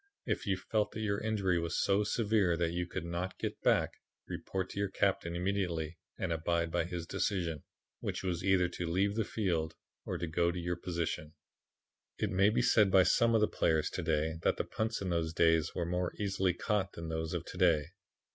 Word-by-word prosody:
If - - -2
you 95 -1 +2
felt 105 +2 -1
that 110 - -4
your 100 -2 0
injury 100 -5 +1
was 85 0 -2
so 100 +1 +3
severe 105 -6 +2
that 85 -1 +1
you 90 0 -2
could 85 - -4
not 85 +2 -3
get - - -4
back, - - +2 0.3
report 95 -1 -4
to - - -5
your 100 -1 0
captain 95 -3 0
immediately 85 -3 -1 0.2
and 90 -3 -1
abide 85 +1 0
by - - +1
his 85 -1 -4
decision, 85 -4 -1 0.4
which - - -3
was 90 -2 -2
either 95 -2 +4
to 90 0 -4
leave 95 +4 +2
the 110 +1 0
field 85 -8 -1 0.3
or - - -3
go 85 0 +1
to 85 - -3
your 90 +1 -1
position. 85 -3 -3 0.8
"It - - -1
may 95 +2 +4
be 120 +3 +1
said 110 -4 +5
by 95 -1 +6
some 115 +6 +4
of 110 - +4
the 105 - +4
players 80 -2 +1
to - - -3
day 80 +1 0
that - - +2
the - - 0
punts 110 0 -2
in 95 -2 -2
those 80 -1 0
days 80 -1 +3
were 85 - -1
more 90 +1 -1
easily 95 -3 0
caught 100 0 -1
than 85 -1 -6
those 80 +1 -2
of 85 -1 -3
to - - -9
day. 85 -5 +4
90 Hz, 205 wpm, -33 LUFS, 85-100 Hz, 0.8 s, by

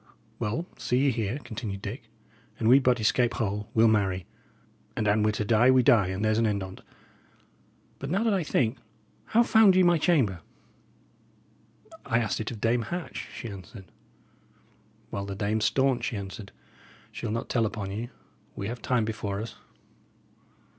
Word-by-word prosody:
"Well, 135 +11 -2
see 125 - 0
ye 135 +1 +3
here," 115 0 -2
continued 110 -4 -6
Dick, - - -7 0.5
"an 110 - 0
we 130 +4 +8
but 125 -2 +2
escape 120 +2 +2
whole 105 -2 -2
we'll 115 0 +6
marry; 95 -4 +1 0.7
and 110 - 0
an 105 +1 +3
we're 105 - +3
to 105 - -2
die, 115 +3 +4
we 130 -1 +5
die, 110 -6 +5
and 95 +3 -2
there's 110 0 +2
an 115 - +3
end 100 -2 -1
on't. 95 0 -9 1.2
But 135 - -5
now 195 +7 +1
that 225 -2 +2
I 190 - +1
think, 125 -4 0 0.5
how 235 +2 +4
found 220 -5 +5
ye 185 - +5
my 175 -2 +4
chamber?" 130 - +2 1.6
"I 115 - +1
asked 115 -3 -1
it 110 - -3
of 115 - -7
Dame 115 +2 +2
Hatch," 170 - -5
she 120 - -6
answered. 95 -1 -10 1.2
"Well, 100 0 -4
the 100 - -5
dame's 105 +1 0
staunch," 135 -1 +2
he 115 - -3
answered; 100 +1 -7 0.6
"she'll 115 - -5
not 115 +2 -3
tell 115 -3 +1
upon 100 -2 -5
you. 115 +4 -4 0.5
We 100 - -4
have 120 0 -6
time 125 -4 +1
before 105 -3 -3
us." 110 +2 -6
110 Hz, 170 wpm, -27 LUFS, 105-125 Hz, 1.6 s, we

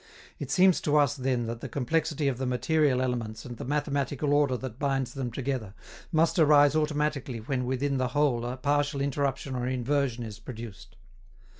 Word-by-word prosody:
It - - -5
seems 185 -1 +4
to 150 0 +2
us, 145 -2 +3
then, 130 -3 -1
that 115 +1 -5
the - - -6
complexity 150 +2 0
of 130 -3 -1
the 130 - -1
material 130 +1 +2
elements 120 -4 -3
and 120 -2 -7
the - - -6
mathematical 145 0 -1
order 145 -3 +3
that 130 -1 -7
binds 135 -3 -1
them 135 -3 -3
together 125 -5 -3 0.4
must 165 +2 +2
arise 145 -1 +6
automatically 150 -4 -1
when 125 +3 -2
within 135 +2 0
the 130 -1 +1
whole 130 -3 +1
a 125 +2 -4
partial 145 +1 0
interruption 140 -1 -1
or 125 0 -2
inversion 130 -1 0
is 110 -2 -8
produced. 110 -1 -9
135 Hz, 175 wpm, -28 LUFS, 125-145 Hz, 0.4 s, arise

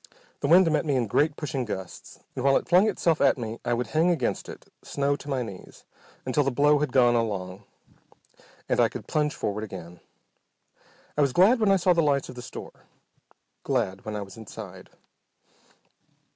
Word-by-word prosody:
The - - -1
wind 175 -1 +6
met 155 - +1
me 145 -4 0
in 125 -2 +1
great 145 +8 +1
pushing 140 -4 -3
gusts, 95 -5 -8
and 125 - -4
while 135 0 +4
it - - -4
flung 185 +5 +5
itself 170 -5 0
at 140 - +4
me 115 -1 -5
I 120 0 0
would 125 +1 -2
hang 160 +3 +1
against 155 -9 -1
it, - - -10 0.2
snow 140 0 -1
to 145 - -11
my 130 -3 -1
knees, 100 -5 -11 0.4
until 130 +3 +1
the 135 - +1
blow 145 +3 +3
had 150 -3 -1
gone 120 -2 +4
along, 100 -5 -2 1.0
when - - 0
I - - +4
could - - -8
plunge 150 -1 0
forward 105 +1 -3
again. 90 -4 -9 1.2
I 150 - +1
was 140 -3 +2
glad 210 +8 +5
when 215 -3 +3
I - - +6
saw 180 -1 +3
the 170 - +2
lights 140 -3 +1
of - - -7
the 125 - -9
store, - - -11 0.7
glad 110 -8 -1
when 110 -1 -5
I 105 - -3
was 95 +1 -13
inside. 110 -2 -10
135 Hz, 190 wpm, -26 LUFS, 110-150 Hz, 1.2 s, wind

